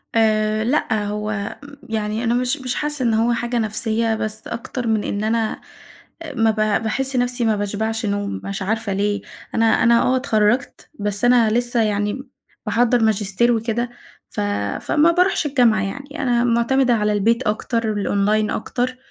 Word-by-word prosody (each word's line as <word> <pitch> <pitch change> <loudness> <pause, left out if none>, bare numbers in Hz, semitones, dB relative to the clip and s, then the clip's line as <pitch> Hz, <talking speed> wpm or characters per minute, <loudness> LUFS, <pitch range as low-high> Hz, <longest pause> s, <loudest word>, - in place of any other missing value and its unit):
آآ 215 -1 +2
لأ 225 -4 0
هو 210 0 -3
م 285 0 -12
يعني 215 +1 -2
أنا 235 0 +1
مش 250 +4 0
مش 255 -1 -3
حاسّة 295 -3 -2
إن 230 -2 +2
هو 230 +2 +2
حاجة 240 +1 -2
نفسيّة، 220 +1 0
بس 215 0 -4
أكتر 235 +1 -5
من 220 -2 +1
إن 205 +1 -2
أنا 225 0 -1 0.6
آآ 295 -4 -8
ما 225 -2 +3
ب 220 - -3 0.3
باحس 265 +4 -1
نفسي 245 -1 0
ما 220 -2 +2
باشبعش 220 +2 -2
نوم 200 0 -2
مش 195 0 -4
عارفة 220 +1 -1
ليه؟ 205 +1 0 0.3
أنا 225 - +2 0.2
أنا 235 0 +5
آه 260 +1 +2
اتخرّجت، 245 0 0
بس 205 +2 -2
أنا 240 -3 +5
لسه 240 0 +1
يعني 210 +4 -1 0.4
باحضّر 235 +2 +2
ماجستير 220 +2 +2
وكده 230 +1 -1 0.4
ف - - -4 0.4
فما 320 +2 +3
باروحش 360 -2 +2
الجامعة، 245 -6 +3
يعني 280 +9 -5
أنا 240 -2 +2
معتمدة 245 +2 +2
على 210 -1 +1
البيت 230 +4 +1
أكتر 225 +2 -1
والأونلاين 210 +1 +1
أكتر، 250 +3 -2
225 Hz, 165 wpm, -21 LUFS, 215-245 Hz, 0.6 s, أنا